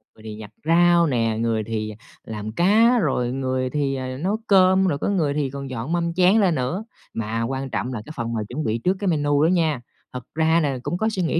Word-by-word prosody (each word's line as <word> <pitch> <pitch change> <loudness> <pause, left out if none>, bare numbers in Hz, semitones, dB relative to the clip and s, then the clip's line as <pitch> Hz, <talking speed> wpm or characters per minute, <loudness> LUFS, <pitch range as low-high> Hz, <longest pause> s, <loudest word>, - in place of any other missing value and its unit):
người - - -18
thì 110 -1 -7
giặt 105 - -9 0.2
rau 170 +1 +4
nè, 115 -4 0
người 115 -1 0
thì 110 -1 -4 0.3
làm 110 -1 -6
cá, 215 - +4
rồi 125 - 0
người 130 -1 -1
thì, 140 -1 -1
à, 130 -1 -4
nấu 190 +9 -1
cơm, 190 -1 +5
rồi 145 - 0
có - - -2
người 165 -8 +1
thì 145 -2 -1
còn 140 0 -7
dọn 130 +3 -5
mâm 170 -1 0
chén 185 +3 +4
lên 180 -5 +3
nữa, 130 +11 -2 0.3
mà 115 +1 -2
quan 135 +3 -3
trọng 125 0 -3
là 115 - -4
cái 155 - -9
phần 115 0 -3
mà 110 - -1
chuẩn 150 +6 -3
bị 110 -2 0
trước 180 +11 +1
cái 200 - -2
menu 145 -3 +2
đó - - +5
nha. 160 -7 +1 0.3
Thật 125 -1 -6
ra 160 +1 +3
là 140 -4 -1
cũng 175 - -2
có 220 +4 +1
suy 205 -4 -2
nghĩ 165 0 +1
140 Hz, 240 wpm, -23 LUFS, 120-175 Hz, 0.3 s, cơm